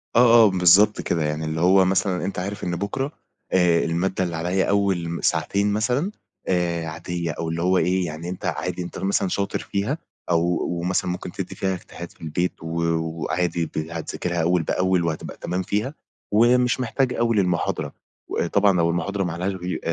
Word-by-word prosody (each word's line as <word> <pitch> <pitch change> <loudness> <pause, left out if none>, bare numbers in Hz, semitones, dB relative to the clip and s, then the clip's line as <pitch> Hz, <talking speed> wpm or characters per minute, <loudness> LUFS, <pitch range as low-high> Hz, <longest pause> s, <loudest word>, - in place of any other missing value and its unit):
آه، 120 -1 +7
آه 105 - +5
بالضبط 95 +3 +5
كده، 80 -2 0
يعني 75 +1 -2
اللي 80 +1 -2
هو 95 +1 +5
مثلًا 95 -1 +1
أنت 95 -1 -3
عارف 100 +3 -4
إن 90 -1 -1
بُكرة 130 - -2 0.4
آآ 90 -2 +4
المادة 95 +3 0
اللي 85 -2 -3
عليَّ 90 +4 0
أول 95 -4 +1
ساعتين 100 +5 +1
مثلًا 125 - 0 0.4
آآ، 85 -2 0
عادية 85 +1 -4
أو 80 +1 -4
اللي 85 +1 -2
هو 95 +1 +3
إيه 90 +2 +2
يعني 80 +2 -5
أنت 90 - -6
عادي 90 0 -2
أنت 85 - -7
مثلًا 95 0 +1
شاطر 100 +2 -1
فيها 105 +9 -2 0.3
أو 85 0 +1
مثلًا 90 0 0
ممكن 90 - -5
تدّي - - -6
فيها 95 -1 -1
اجتهاد 85 -1 -9
في - - -25
البيت 80 +2 -2
و - - -5 0.3
وعادي 85 +1 -1
ت 80 - -10
هتذاكرها 85 +2 -3
أول 85 +1 +2
بأول، 90 +2 +1
وهتبقى 80 -2 -3
تمام 90 +1 -2
فيها، 105 +9 -1 0.4
ومش 125 +3 +4
محتاج 125 +1 0
أوي 115 -1 +1
للمحاضرة 90 -4 0 0.4
و - - 0
طبعًا 100 +2 +3
لو 85 -1 +3
المحاضرة 95 +4 -1
ما 90 - -2
عليهاش 90 +3 -2
غي 90 -1 -4
90 Hz, 180 wpm, -23 LUFS, 85-100 Hz, 0.4 s, آه